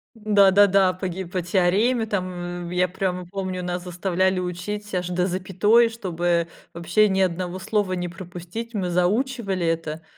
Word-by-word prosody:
Да-да-да. 200 -3 +4
Погиб 185 -1 -5
по 185 - -1
теореме, 195 +7 +2
там, 175 -3 -4
в - - -6
Я 180 0 +2
прямо 180 0 -3
помню, 185 0 -4
нас 180 0 -3
заставляли 185 +1 0
учить 190 +4 -5
аж 180 -1 -1
до 180 0 0
запятой, 195 +5 +3
чтобы 175 -6 -1 0.3
вообще 175 +6 +2
ни 190 - 0
одного 180 -1 0
слова 205 0 0
не 175 -1 -3
пропустить. 180 +6 -8
Мы 185 -3 -1
заучивали 195 +1 0
это, 165 -1 -2
185 Hz, 145 wpm, -23 LUFS, 175-200 Hz, 0.3 s, Да-да-да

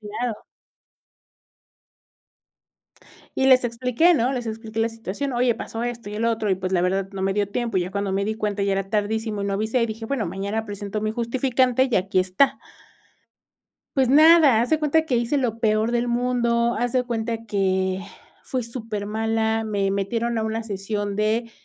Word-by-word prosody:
Claro. 215 +2 -4 2.9
Y 265 - +2
les 255 -1 +6
expliqué, 250 +8 +2
¿no? 250 -2 +1
Les 245 -3 -3
expliqué 225 0 -4
la 225 - +2
situación: 230 +4 -5
"Oye, 240 -1 +2
pasó 225 +1 -6
esto, 240 -3 -4
y 210 - -6
el 220 +2 -2
otro. 225 -2 0
Y 190 - +3
pues, 185 0 -4
la 180 - +3
verdad, 190 +2 0
no 195 - -6
me 195 0 0
dio 205 0 +1
tiempo. 235 +2 -2
Ya 180 0 0
cuando 200 0 -2
me 195 +1 0
di 220 - -1
cuenta, 210 -2 -2
ya 200 - +1
era 195 0 -2
tardísimo, 215 0 -1
y - - -2
no 200 - -1
avisé". 220 +5 0
Y - - +2
dije: 225 0 -6
"Bueno, 250 -4 -1
mañana 200 +5 -3
presento 205 0 -5
mi 215 - 0
justificante, 255 +2 +1
y - - +4
aquí 190 0 0
está". 185 +9 +2 1.4
Pues 260 -2 +3
nada, 305 -4 +7
haz 240 - 0
de 315 - +2
cuenta 315 +1 +2
que 255 - +1
hice 235 +5 +1
lo 235 -4 -1
peor 220 0 +1
del 240 0 0
mundo. 235 -1 +1
Haz 245 0 -1
de 255 -1 +1
cuenta 230 -1 -3
que 190 -2 0 0.4
fui 255 -2 -3
súper 225 -3 -5
mala. 220 +1 0
Me 200 -2 0
metieron 230 +4 -1
a 220 - 0
una 220 +1 -2
sesión 205 -1 -3
de 220 +2 0
225 Hz, 190 wpm, -23 LUFS, 205-240 Hz, 2.9 s, nada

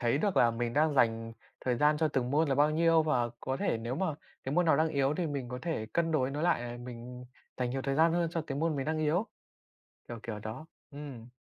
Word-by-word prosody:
thấy 120 +2 +2
được 200 +4 0
là 120 - +6
mình 115 0 -2
đang 150 +2 +2
dành 115 -3 +2 0.3
thời 125 -2 0
gian 150 +2 +4
cho 160 +1 +2
từng 130 -4 -1
môn 150 +2 +2
là 135 - +2
bao 145 +2 +4
nhiêu, 165 +1 +4
và 125 -6 +1
có 130 0 -2
thể 115 - 0
nếu 115 +3 -3
mà 190 +5 0 0.4
cái 135 +3 -2
môn 180 -1 +3
nào 150 -3 +5
đang 160 +1 +3
yếu 140 -1 +1
thì 175 -3 -1
mình 140 -4 -4
có 125 - -5
thể 160 -10 -2
cân 165 -1 +1
đối 130 -4 +1
nó 145 +3 -3
lại, 170 -7 +2
ờ, 120 0 -6
mình 125 0 -8 0.3
dành 125 -1 -1
nhiều 135 0 -2
thời 135 0 -1
gian 160 +2 +4
hơn 170 0 +1
cho 165 - -1
cái 135 -1 -3
môn 160 -1 0
mình 135 - -2
đang 155 0 0
yếu, 160 +8 +1 0.8
kiểu, 120 - -6
kiểu 110 -2 -5
đó. 110 +9 -7 0.2
Ừm, 140 -5 -9
140 Hz, 255 wpm, -31 LUFS, 120-160 Hz, 0.8 s, là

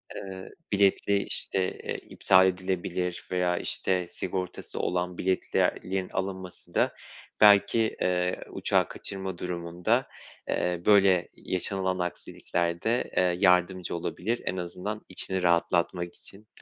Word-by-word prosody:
Iıı, 95 -1 -7 0.2
biletli, 100 0 +3
işte, 95 - -1 0.2
eee, - - -3
iptal 95 0 +4
edilebilir 90 -1 -2
veya 90 -1 +1
işte 90 -2 -1
sigortası 90 0 -4
olan 90 0 -1
biletlerin 95 0 0
alınması 95 -1 -5
da - - +2 0.5
belki, 105 +2 +7 0.2
eee, 90 0 +1
uçağı - - +1
kaçırma 95 -2 -5
durumunda, 90 +7 -1 0.4
eee, 90 -1 0
böyle 95 -4 +5
yaşanılan 95 0 -2
aksiliklerde, 90 +4 -2
eee, 90 -1 +3
yardımcı 90 -1 +3
olabilir. 110 +7 -2
En 95 - -2
azından 90 +5 -4
içini 95 0 0
rahatlatmak 85 0 +1
için 105 +2 -11
90 Hz, 110 wpm, -28 LUFS, 90-95 Hz, 0.5 s, belki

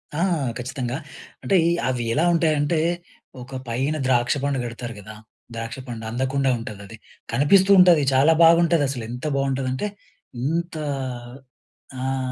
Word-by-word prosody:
ఆ! - - -2 0.4
ఖచ్చితంగా, 125 0 -4 0.5
అంటే, 195 - +1
ఈ - - +2 0.2
అవి 125 -2 -1
ఎలా 160 +6 +2
ఉంటాయంటే, 155 -1 +1 0.6
ఒక 130 +2 -9
పైన 135 +6 -1
ద్రాక్ష 125 0 +2
పండు 140 -2 0
కడతారు 120 0 -6
కదా! 110 +2 -11 0.4
ద్రాక్ష 115 +2 -5
పండు 115 -2 -6
అందకుండా 130 +2 0
ఉంటదది. 105 -1 -9 0.4
కనిపిస్తూ 190 +8 +4
ఉంటది. 175 -4 +7
చాలా 135 +5 +5
బాగుంటుదసలు. 165 -6 +3
ఎంత 125 +4 -7
బావుంటదంటే, 135 +4 -1 0.6
ఇంత 165 +4 -2 1.3
ఆహ్, 135 +1 -1
135 Hz, 120 wpm, -23 LUFS, 120-155 Hz, 1.3 s, ఉంటది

